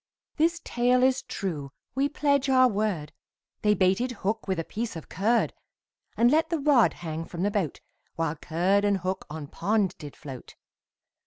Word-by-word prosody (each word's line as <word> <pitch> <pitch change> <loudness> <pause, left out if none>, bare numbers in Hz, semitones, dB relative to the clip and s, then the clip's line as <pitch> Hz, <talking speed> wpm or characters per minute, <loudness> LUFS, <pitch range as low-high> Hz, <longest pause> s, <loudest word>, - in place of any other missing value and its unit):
This 335 +2 +2
tale 250 +1 +2
is 260 0 +3
true 155 -8 -4 0.2
we 275 +2 +1
pledge 280 -2 +1
our 255 -1 +6
word, 205 -9 -1 0.5
They 210 0 +3
baited 190 +7 +2
hook 215 +2 -1
with 190 -2 0
a - - -1
piece 225 +3 -4
of 160 - -8
curd, 220 +6 +1 0.6
And 240 +1 +5
let 320 +2 +3
the 335 - 0
rod 280 -5 +4
hang 160 0 -3
from 175 +1 -5
the 205 - +1
boat, 190 -9 -2 0.3
While 165 -1 -1
curd 180 +6 +1
and 205 -1 +3
hook 185 +1 -3
on 155 0 -6
pond 200 +6 0
did 145 -2 -9
float. 135 -5 -10
205 Hz, 170 wpm, -27 LUFS, 170-250 Hz, 0.6 s, our